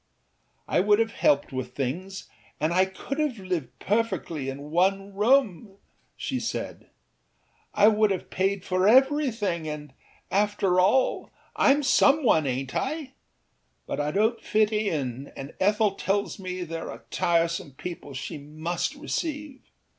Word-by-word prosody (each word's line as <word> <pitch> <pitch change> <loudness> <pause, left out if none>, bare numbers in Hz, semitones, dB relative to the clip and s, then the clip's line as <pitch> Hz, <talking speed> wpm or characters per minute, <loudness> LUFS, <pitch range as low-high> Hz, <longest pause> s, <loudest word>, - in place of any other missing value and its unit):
âI - - +2
would 205 0 +5
have 225 0 +1
helped 295 - +2
with 130 -1 -5
things, 180 +9 -4 0.3
and 155 +3 +1
I 185 +2 +4
could 260 +9 -6
have 295 -6 0
lived 180 -9 -4
perfectly 190 -10 -1
in 140 +2 -7
one 195 +3 +1
room,â 210 -3 +2 0.4
she - - -2
said; - - -5 0.9
âI 210 +1 +6
would 215 0 +3
have 190 -2 -3
paid 195 0 0
for 185 +1 +2
everything, 240 - +3
andâafter 185 - 0 0.3
allâIâm 280 +1 +4
some 280 +3 +4
one, 160 - +4
ainât 130 0 -2
I? 300 -4 -3 0.7
But - - -4
I 145 0 0
donât 220 +5 +1
fit 215 0 +2
in, 140 - -2
and 135 +2 -7
Ethel 210 +1 +3
tells 200 +1 -2
me 185 -1 -4
there 165 -1 -5
are - - -10
tiresome 170 -4 0
people 145 -2 -8
she 140 +3 -5
must 155 - -3
receive. 300 -1 -4
195 Hz, 135 wpm, -26 LUFS, 160-225 Hz, 0.9 s, âI